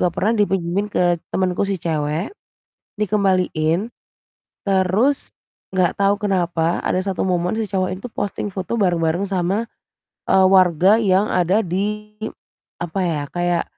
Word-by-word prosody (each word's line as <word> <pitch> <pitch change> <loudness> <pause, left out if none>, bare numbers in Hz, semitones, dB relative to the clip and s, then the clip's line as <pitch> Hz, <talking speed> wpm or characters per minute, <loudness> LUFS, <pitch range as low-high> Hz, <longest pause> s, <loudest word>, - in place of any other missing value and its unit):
juga 180 - +3
pernah 210 +5 +1
dipinjemin 195 -1 0
ke 175 -3 +1
temenku 185 +1 0
si 195 - 0
cewek 155 - -2 0.7
dikembaliin, 185 -3 +1 0.8
terus 195 +8 +1 0.4
enggak 180 -2 +1
tahu 200 0 +3
kenapa 175 -4 0
ada - - +1
satu 195 -2 -2
momen 180 0 0
si 220 - -1
cowok 185 -2 -1
itu 200 - -7
posting 205 0 -3
foto 195 +5 -3
bareng-bareng 175 -1 +1
sama, 195 +3 -1 0.6
eee, 190 0 +6
warga 185 0 +5
yang 195 -1 +3
ada 185 +3 +2
di, 210 +4 -3 0.7
apa 175 +3 -3
ya, 160 -5 -1
kayak 175 -1 0
185 Hz, 130 wpm, -20 LUFS, 175-200 Hz, 0.8 s, eee